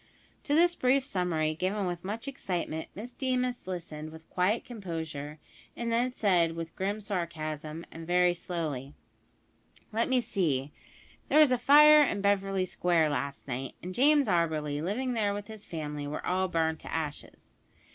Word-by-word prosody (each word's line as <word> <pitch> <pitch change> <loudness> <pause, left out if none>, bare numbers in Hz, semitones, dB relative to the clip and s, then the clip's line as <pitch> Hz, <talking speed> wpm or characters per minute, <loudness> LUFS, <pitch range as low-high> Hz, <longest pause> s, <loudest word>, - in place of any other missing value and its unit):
To 290 - +1
this 345 +2 +5
brief 265 -3 +2
summary, 170 - 0
given 190 +5 -1
with 175 -1 -3
much 215 +7 -5
excitement, 175 - -3
Miss 240 +5 -7
Deemas 250 -4 -1
listened 160 -4 -5
with 160 0 -13
quiet 190 +5 +1
composure, 160 - -6 0.4
and 235 -1 -2
then 240 +2 +1
said 175 -8 +2
with 165 0 -6
grim 200 +3 -2
sarcasm, 165 -5 -4
and 165 0 -9
very 180 0 +4
slowly: 155 -6 -4 1.0
"Let 230 +3 +1
me 260 -1 +4
see; 165 - -1 0.6
there - - +4
was 300 -4 +7
a 250 - +3
fire 300 +3 +8
in 270 -8 +1
Beverly 195 -1 +1
Square 170 -3 +2
last 140 0 -3
night, 130 +1 -4
and 180 +1 -5
James 285 +3 +4
Auberly, 155 -5 0
living 245 +9 -1
there 205 -3 0
with 205 0 -5
his 215 -1 -11
family, 150 -3 -4
were 150 - -5
all 185 +1 +1
burned 160 -2 0
to - - -9
ashes." 150 -3 -6
180 Hz, 160 wpm, -29 LUFS, 160-230 Hz, 1.0 s, fire